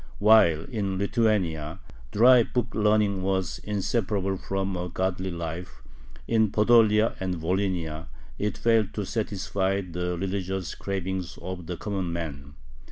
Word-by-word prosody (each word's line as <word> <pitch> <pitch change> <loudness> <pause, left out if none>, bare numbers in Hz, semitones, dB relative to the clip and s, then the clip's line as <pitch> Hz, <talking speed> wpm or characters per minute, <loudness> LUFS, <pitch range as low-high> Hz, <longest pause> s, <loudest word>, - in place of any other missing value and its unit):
While 100 -7 +5
in 100 -4 -3
Lithuania 95 -6 0 0.3
dry 125 +3 +7
book 120 0 -2
learning 105 -2 +2
was 95 -1 -1
inseparable 100 -1 -1
from 95 0 -3
a 90 0 -3
godly 95 +1 -2
life, 85 0 -6 0.4
in 110 -2 +3
Podolia 110 0 +4
and 95 -1 -2
Volhynia 85 -2 -2 0.3
it 105 +1 -1
failed 115 -3 +2
to 105 - -2
satisfy 100 -2 -1
the 90 -1 -3
religious 95 -1 -3
cravings 95 -2 -4
of 90 -3 -7
the 90 -1 -4
common 95 -4 -3
man. 70 -4 -6
95 Hz, 125 wpm, -26 LUFS, 90-105 Hz, 0.4 s, dry